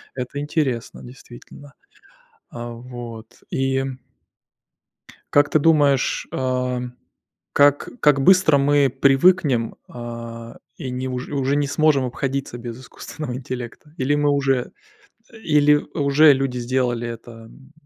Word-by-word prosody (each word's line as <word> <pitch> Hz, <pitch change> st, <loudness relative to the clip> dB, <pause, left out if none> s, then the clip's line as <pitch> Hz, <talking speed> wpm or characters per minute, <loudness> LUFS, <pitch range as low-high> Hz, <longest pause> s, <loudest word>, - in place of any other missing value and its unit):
Это 130 Hz, +2 st, -5 dB
интересно, 145 Hz, -5 st, -2 dB
действительно. 130 Hz, +3 st, -14 dB, 0.8 s
А, 120 Hz, 0 st, -7 dB
вот, 120 Hz, -1 st, -10 dB
и 135 Hz, 0 st, 0 dB, 1.5 s
Как 145 Hz, 0 st, +4 dB
ты 155 Hz, -, +3 dB
думаешь, 145 Hz, -4 st, +2 dB
а, 125 Hz, -1 st, -1 dB, 0.7 s
как 145 Hz, 0 st, +3 dB
как 145 Hz, -2 st, +4 dB
быстро 185 Hz, -3 st, +5 dB
мы 140 Hz, 0 st, +3 dB
привыкнем, 135 Hz, -1 st, +3 dB
а, 115 Hz, -1 st, -8 dB, 0.2 s
и, 135 Hz, -5 st, -6 dB
ни 125 Hz, +1 st, -4 dB
уже 125 Hz, +3 st, -5 dB
уже 135 Hz, +1 st, 0 dB
не 145 Hz, -1 st, +1 dB
сможем 145 Hz, -3 st, +2 dB
обходиться 135 Hz, 0 st, -3 dB
без 120 Hz, 0 st, -8 dB
искусственного 130 Hz, 0 st, -8 dB
интеллекта? 130 Hz, +3 st, -7 dB
Или 135 Hz, +3 st, +1 dB
мы 145 Hz, 0 st, +2 dB
уже 135 Hz, -3 st, 0 dB, 0.6 s
или 150 Hz, -9 st, +3 dB, 0.2 s
уже 145 Hz, +1 st, +5 dB
люди 135 Hz, -2 st, -2 dB
сделали 120 Hz, -1 st, -1 dB
это? 115 Hz, 0 st, -8 dB
М 135 Hz, +4 st, -17 dB
135 Hz, 120 wpm, -21 LUFS, 125-145 Hz, 1.5 s, быстро